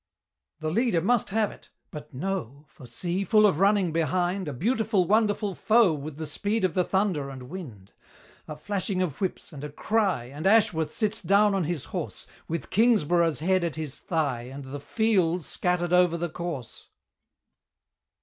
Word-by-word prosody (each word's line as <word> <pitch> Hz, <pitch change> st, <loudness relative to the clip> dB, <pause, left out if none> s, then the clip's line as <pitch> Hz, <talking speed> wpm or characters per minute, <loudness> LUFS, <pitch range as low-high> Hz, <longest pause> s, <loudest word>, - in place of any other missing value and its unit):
The 155 Hz, 0 st, -2 dB
leader 230 Hz, -2 st, +2 dB
must 225 Hz, +6 st, +1 dB
have 210 Hz, 0 st, +1 dB
it -, -, -16 dB, 0.2 s
but 150 Hz, -, -9 dB
no! 150 Hz, -2 st, -4 dB
For 150 Hz, -5 st, -14 dB
see, 175 Hz, +10 st, -2 dB
full 215 Hz, +1 st, +4 dB
of 190 Hz, -6 st, +3 dB
running, 195 Hz, -3 st, +3 dB
behind 175 Hz, +3 st, 0 dB
A -, -, -2 dB
beautiful, 215 Hz, -, +1 dB
wonderful 210 Hz, 0 st, +1 dB
foe 220 Hz, -2 st, +4 dB
With 150 Hz, 0 st, -6 dB
the 160 Hz, -, -4 dB
speed 205 Hz, +8 st, -1 dB
of 185 Hz, -, 0 dB
the 180 Hz, -, +2 dB
thunder 185 Hz, -8 st, 0 dB
and 130 Hz, -2 st, -8 dB
wind! 120 Hz, -, -9 dB, 0.5 s
A 150 Hz, -, -6 dB
flashing 185 Hz, +3 st, -2 dB
of 160 Hz, -3 st, -5 dB
whips, 185 Hz, -2 st, -3 dB
and 145 Hz, -1 st, -8 dB
a 150 Hz, -, -4 dB
cry, 195 Hz, -, 0 dB
And 145 Hz, +8 st, -4 dB
Ashworth 180 Hz, -8 st, +3 dB
sits 220 Hz, 0 st, -1 dB
down 205 Hz, +1 st, +4 dB
on 190 Hz, -4 st, 0 dB
his 160 Hz, -3 st, -3 dB
horse, -, -, -4 dB, 0.2 s
With 165 Hz, +1 st, -4 dB
Kingsborough's 175 Hz, -8 st, +3 dB
head 185 Hz, +2 st, +2 dB
at 170 Hz, -3 st, -2 dB
his 155 Hz, -4 st, -4 dB
thigh 140 Hz, -8 st, -2 dB
And 140 Hz, +1 st, -8 dB
the 135 Hz, +2 st, -7 dB
"field" 180 Hz, -1 st, +1 dB
scattered 180 Hz, -1 st, -1 dB
over 180 Hz, -1 st, +4 dB
the 175 Hz, +1 st, -2 dB
course! 155 Hz, -9 st, -6 dB
175 Hz, 170 wpm, -26 LUFS, 150-200 Hz, 0.5 s, full